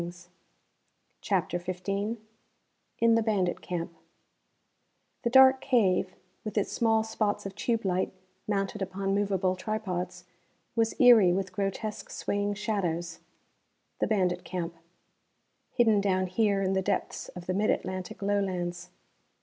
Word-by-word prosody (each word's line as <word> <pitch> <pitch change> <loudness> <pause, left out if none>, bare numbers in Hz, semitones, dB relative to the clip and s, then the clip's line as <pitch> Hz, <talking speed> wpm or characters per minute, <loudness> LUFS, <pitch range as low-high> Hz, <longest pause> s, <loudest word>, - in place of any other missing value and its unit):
_] 175 +1 -8 0.9
CHAPTER 180 -3 0
XV 180 +1 -6 1.1
In 230 0 +4
the 230 - +4
Bandit 200 -5 0
Camp 170 -1 -4 1.3
The 235 - 0
dark 265 +1 +7
cave, 190 -8 +2 0.3
with 215 -1 -5
its 205 - +1
small 225 -1 +2
spots 215 -2 -1
of 195 - -5
tube 225 +2 -1
light 185 0 0 0.4
mounted 195 -1 -1
upon 195 +1 -2
movable 195 -2 +1
tripods, 185 -3 -4 0.5
was 225 -1 +1
eery 230 -8 +7
with 190 +1 -2
grotesque 200 +2 -3
swaying 205 0 -2
shadows. 175 -6 -2 0.8
The - - +1
bandit 180 -4 +1
camp. 175 -2 -4 1.0
Hidden 220 -4 +3
down 185 -2 +1
here 200 +1 +1
in 190 0 +1
the 190 - +1
depths - - -2
of 180 -1 -8
the 185 - -1
Mid 205 +3 +1
Atlantic 185 +1 -3
Lowlands. 180 -3 -1
195 Hz, 125 wpm, -29 LUFS, 180-215 Hz, 1.3 s, dark